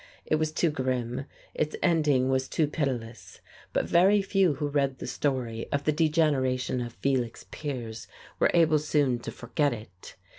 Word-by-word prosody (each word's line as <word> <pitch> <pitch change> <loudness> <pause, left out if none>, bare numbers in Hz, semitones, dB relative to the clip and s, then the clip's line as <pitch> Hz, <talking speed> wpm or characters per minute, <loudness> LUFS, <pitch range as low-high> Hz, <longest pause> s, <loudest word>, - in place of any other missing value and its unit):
It 155 - +2
was 155 0 0
too 160 +1 +1
grim, 130 -2 -2 0.3
its 155 0 -1
ending 150 -7 +3
was 130 0 +1
too 160 - +1
pitiless. 130 -6 -4 0.3
But - - 0
very 195 +4 +5
few 195 -5 +2
who 145 +2 -2
read 140 -2 0
the - - -7
story 125 -5 -2
of 145 0 0
the 155 - +2
degeneration 145 -6 +1
of 120 -1 -5
Felix 125 -4 -1
Piers 120 -7 -5 0.3
were - - +4
able 160 -3 +5
soon 145 -4 +1
to - - -7
forget 140 +3 -1
it. 105 -6 -11
140 Hz, 160 wpm, -28 LUFS, 125-155 Hz, 0.3 s, very